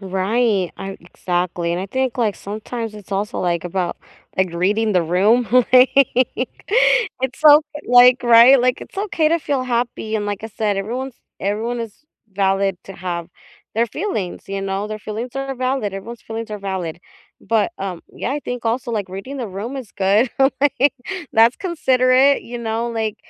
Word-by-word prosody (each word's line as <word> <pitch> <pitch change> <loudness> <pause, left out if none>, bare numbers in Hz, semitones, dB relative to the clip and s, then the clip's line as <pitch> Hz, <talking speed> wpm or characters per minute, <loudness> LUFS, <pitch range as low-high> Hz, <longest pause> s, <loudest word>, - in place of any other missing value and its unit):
Right, 195 +1 0
ar 195 0 -6
exactly, 175 0 -2
and 175 - -2
I 190 - -4
think, 260 +4 -2
like, 220 -4 +1
sometimes 220 +2 -6
it's 205 -2 -13
also, 200 +2 -2
like, 175 -2 -1
about, 175 0 -2 0.4
like, 185 -2 +1
reading 210 +6 +1
the 180 -2 +3
room, 205 +8 +2 0.2
like, 255 0 +8 1.3
it's 265 0 -3
so 300 0 +8
eh, - - -7
like, 245 +1 +7
right? 240 +2 +7
Like, 250 0 +1
it's - - -10
okay 355 -6 +1
to 335 - +3
feel 280 -4 -1
happy, 235 -3 -2
and 210 -1 -1
like 205 +1 -4
I - - -5
said, 215 -2 -1
everyone's 245 +6 -4 0.2
everyone 225 +4 -2
is 230 +5 -8 0.3
valid 195 0 +1
to 195 - -9
have 175 -2 -5 0.5
their 230 +2 +2
feelings, 215 - -4
you 195 0 -3
know? 195 +1 -2
Their 215 0 -5
feelings 215 +4 -5
are 270 0 -3
valid, 255 -5 -2
everyone's 230 +4 -8
feelings 225 0 -6
are 210 - -4
valid. 190 -4 -4 0.4
But, 225 +6 0
um, 185 -3 -5
yeah, 250 - -3
I 295 - -2
think 245 -3 -5
also, 240 +2 -1
like, 205 -4 -2
reading 195 +10 -7
the 240 -4 -4
room 205 +8 -5
is 240 -6 -9
good, 205 +5 +2 0.3
like, 285 -1 +3 0.4
that's 230 +2 +5
considerate, 265 -5 +3
you 240 +1 -7
know? 230 0 -2
Like, 220 -2 -2
220 Hz, 175 wpm, -20 LUFS, 195-250 Hz, 1.3 s, like